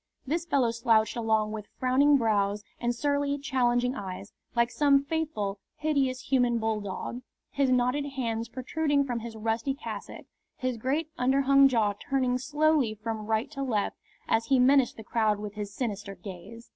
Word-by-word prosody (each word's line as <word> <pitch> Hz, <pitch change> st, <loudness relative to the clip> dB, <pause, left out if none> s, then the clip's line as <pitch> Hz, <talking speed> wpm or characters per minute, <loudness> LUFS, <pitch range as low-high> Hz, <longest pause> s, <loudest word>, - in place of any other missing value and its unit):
This 330 Hz, +5 st, -2 dB
fellow 255 Hz, -7 st, +2 dB
slouched 225 Hz, -1 st, +2 dB
along 220 Hz, -2 st, +1 dB
with 215 Hz, -1 st, -6 dB
frowning 275 Hz, +3 st, +4 dB
brows 205 Hz, -3 st, +1 dB, 0.2 s
and 240 Hz, 0 st, -1 dB
surly, 285 Hz, +2 st, 0 dB
challenging 250 Hz, -3 st, +1 dB
eyes, 195 Hz, -4 st, -7 dB, 0.2 s
like 235 Hz, 0 st, +2 dB
some 280 Hz, -2 st, +4 dB
faithful, 280 Hz, -11 st, -2 dB, 0.2 s
hideous 275 Hz, -4 st, 0 dB
human 245 Hz, -3 st, +2 dB
bulldog, 220 Hz, +1 st, -3 dB, 0.3 s
his 275 Hz, -2 st, +1 dB
knotted 250 Hz, +3 st, +2 dB
hands 230 Hz, -4 st, -3 dB
protruding 280 Hz, +4 st, 0 dB
from 245 Hz, -4 st, -3 dB
his 230 Hz, 0 st, -7 dB
rusty 225 Hz, +4 st, -1 dB
cassock, 220 Hz, -7 st, -7 dB, 0.3 s
his 255 Hz, -2 st, -2 dB
great 285 Hz, +7 st, -1 dB
underhung 275 Hz, +2 st, +5 dB
jaw 225 Hz, -6 st, +2 dB
turning 255 Hz, +2 st, -1 dB
slowly 295 Hz, -4 st, +2 dB
from 215 Hz, 0 st, -5 dB
right 225 Hz, +5 st, 0 dB
to 275 Hz, -2 st, -5 dB
left 225 Hz, -7 st, -1 dB, 0.3 s
as 225 Hz, 0 st, +2 dB
he 265 Hz, +3 st, +3 dB
menaced 260 Hz, 0 st, +4 dB
the 220 Hz, -, -8 dB
crowd 215 Hz, -1 st, +1 dB
with 205 Hz, 0 st, -6 dB
his 205 Hz, -1 st, -5 dB
sinister 205 Hz, -3 st, -4 dB
gaze. 195 Hz, +5 st, -10 dB
240 Hz, 160 wpm, -28 LUFS, 220-275 Hz, 0.3 s, underhung